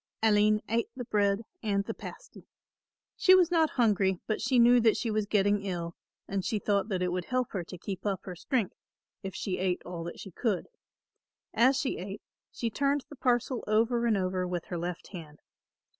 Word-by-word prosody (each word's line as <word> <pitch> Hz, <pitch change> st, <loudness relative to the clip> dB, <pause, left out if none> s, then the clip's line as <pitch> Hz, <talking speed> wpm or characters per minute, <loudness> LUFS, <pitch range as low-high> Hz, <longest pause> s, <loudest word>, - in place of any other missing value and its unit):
Aline 210 Hz, -1 st, +4 dB
ate 230 Hz, +1 st, 0 dB
the 250 Hz, -2 st, -5 dB
bread 205 Hz, 0 st, +1 dB, 0.2 s
and 200 Hz, -3 st, 0 dB
the -, -, -4 dB
pasty. -, -, -11 dB, 0.7 s
She 370 Hz, -, +6 dB
was 355 Hz, -2 st, +4 dB
not 325 Hz, -2 st, +4 dB
hungry 200 Hz, -6 st, +2 dB
but 215 Hz, -, -2 dB
she 260 Hz, -, +2 dB
knew 240 Hz, +1 st, +7 dB
that 225 Hz, -2 st, +4 dB
she 230 Hz, -, -1 dB
was 215 Hz, -1 st, 0 dB
getting 205 Hz, 0 st, +2 dB
ill 175 Hz, -3 st, -4 dB, 0.3 s
and 195 Hz, -1 st, -2 dB
she 215 Hz, -, 0 dB
thought 200 Hz, 0 st, 0 dB
that 185 Hz, -3 st, 0 dB
it 180 Hz, -, 0 dB
would 180 Hz, 0 st, -2 dB
help 255 Hz, -1 st, -1 dB
her 190 Hz, -4 st, -3 dB
to 180 Hz, -, -9 dB
keep 190 Hz, +2 st, -6 dB
up 195 Hz, -3 st, -1 dB
her 185 Hz, -, -7 dB
strength, 220 Hz, +3 st, -1 dB, 0.5 s
if 190 Hz, -1 st, -6 dB
she 185 Hz, -2 st, -3 dB
ate 185 Hz, -1 st, 0 dB
all 175 Hz, -1 st, -5 dB
that 170 Hz, -, -7 dB
she 195 Hz, -, -8 dB
could. 210 Hz, +1 st, -1 dB, 0.8 s
As 255 Hz, +4 st, +4 dB
she 270 Hz, -1 st, -1 dB
ate, 195 Hz, +3 st, -7 dB, 0.3 s
she 230 Hz, -2 st, -3 dB
turned 280 Hz, +3 st, 0 dB
the 290 Hz, -, -10 dB
parcel 250 Hz, -1 st, 0 dB
over 230 Hz, +3 st, +2 dB
and 220 Hz, -3 st, +3 dB
over 185 Hz, -1 st, -1 dB
with 175 Hz, -1 st, -3 dB
her 175 Hz, -, -3 dB
left 175 Hz, 0 st, -5 dB
hand. 160 Hz, -6 st, -9 dB
205 Hz, 200 wpm, -29 LUFS, 185-235 Hz, 0.8 s, knew